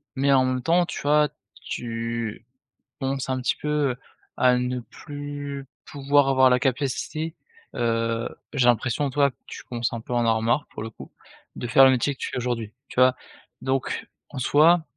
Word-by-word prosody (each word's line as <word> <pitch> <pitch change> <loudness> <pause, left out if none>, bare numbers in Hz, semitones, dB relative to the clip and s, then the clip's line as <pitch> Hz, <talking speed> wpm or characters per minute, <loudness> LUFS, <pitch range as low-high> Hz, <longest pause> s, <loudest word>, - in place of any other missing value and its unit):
mais 140 +1 +2
en 130 -1 +5
même 130 0 0
temps 170 +6 +3
tu - - -6
vois? 150 +1 +3 0.4
Tu 115 -1 -4 0.5
commences 135 -1 -2
un 130 0 0
petit 125 - 0
peu, 150 -2 0
heu, - - -5 0.4
à 125 -1 +4
ne 125 0 -1
plus 145 +1 -7 0.2
pouvoir 145 -1 +2
avoir 130 -1 +5
la 125 0 +3
capacité, 145 +5 -2 0.4
heu, 115 0 0 0.3
j'ai 135 -4 +2
l'impression 120 +3 +2
tu - - -15
vois? 140 -1 +4
Que 125 - -18
tu - - -9
commences 120 -1 -3
un 115 - -4
peu 115 - -11
à - - +1
en - - +2
avoir 115 -1 +2
marre 120 +6 +1
pour - - -7
le 115 - -5
coup, 115 - -12 0.5
de - - -5
faire 135 +3 +7
le 130 - +7
métier 130 +3 +1
que - - -31
tu - - -3
fais - - -4
aujourd'hui, 120 -3 -2 0.2
tu - - -3
vois? 130 0 +6 0.5
Donc 130 0 -2 0.2
en 140 - -5
soi, 160 +6 +5
130 Hz, 195 wpm, -25 LUFS, 120-145 Hz, 0.5 s, faire